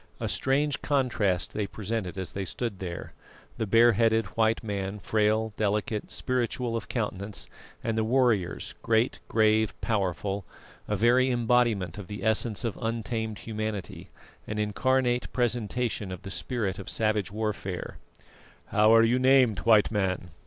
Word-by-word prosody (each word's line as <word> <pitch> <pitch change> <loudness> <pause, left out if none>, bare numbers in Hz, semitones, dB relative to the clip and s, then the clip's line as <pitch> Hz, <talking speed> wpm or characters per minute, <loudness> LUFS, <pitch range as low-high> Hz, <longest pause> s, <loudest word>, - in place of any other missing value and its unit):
A - - -2
strange 140 +2 +1
contrast 115 - 0
they 105 -2 -2
presented 105 -2 -4
as 95 -1 -5
they 100 - -3
stood 100 +2 -4
there; 85 -2 -6 0.5
the 110 - -1
bare 115 +4 +6
headed 115 0 +2
white 115 0 +2
man 100 -1 -3
frail, 110 +2 +1
delicate, 105 0 -1
spiritual 125 -1 -1
of 115 - -4
countenance, 105 -3 -3 0.4
and 115 -1 -1
the 110 - +1
warriors 110 -5 +1
great, 115 +2 +1
grave, 110 -1 +2
powerful, 100 -1 -1 0.4
a 105 - 0
very 120 +5 +4
embodiment 120 -7 +1
of 100 - -8
the 105 - -7
essence 110 0 +1
of 115 -3 -3
untamed 115 -1 -2
humanity, 110 -4 -5 0.4
an 105 - -4
incarnate 125 +4 +1
presentation 120 -3 -1
of 90 - -7
the 95 - -7
spirit 95 +3 -2
of 100 - -7
savage 110 -2 0
warfare. 105 -4 -4 0.7
"How 105 +1 +4
are 115 - +7
you 120 +3 +3
named, 130 -6 +4
White 110 -2 +5
Man?" 95 -4 -1
110 Hz, 145 wpm, -28 LUFS, 100-120 Hz, 0.7 s, are